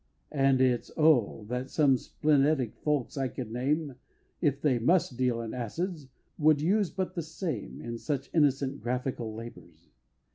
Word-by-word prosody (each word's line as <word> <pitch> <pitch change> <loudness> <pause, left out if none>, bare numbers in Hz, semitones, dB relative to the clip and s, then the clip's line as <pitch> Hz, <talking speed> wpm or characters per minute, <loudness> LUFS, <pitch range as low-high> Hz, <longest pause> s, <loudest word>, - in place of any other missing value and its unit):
And 135 -2 +3
it's, 125 -2 +2
oh! 135 -9 +3
that 125 +3 -3
some 145 -4 +4
splenetic 145 -3 +1
folks 150 -3 -1
I 135 - +1
could 125 -3 -6
name 140 +3 -1 0.4
If 140 -4 +1
they 135 -5 +2
must 160 +1 +2
deal 125 -2 0
in 115 -1 -5
acids 150 - -4 0.3
would 155 -1 +5
use 190 +5 +2
but 185 -1 -3
the 175 - -2
same, 160 +1 -5
In 115 0 -6
such 140 -1 -3
innocent 140 -3 +2
graphical 120 -2 -3
labors! 85 -8 -11
135 Hz, 150 wpm, -29 LUFS, 120-155 Hz, 0.4 s, would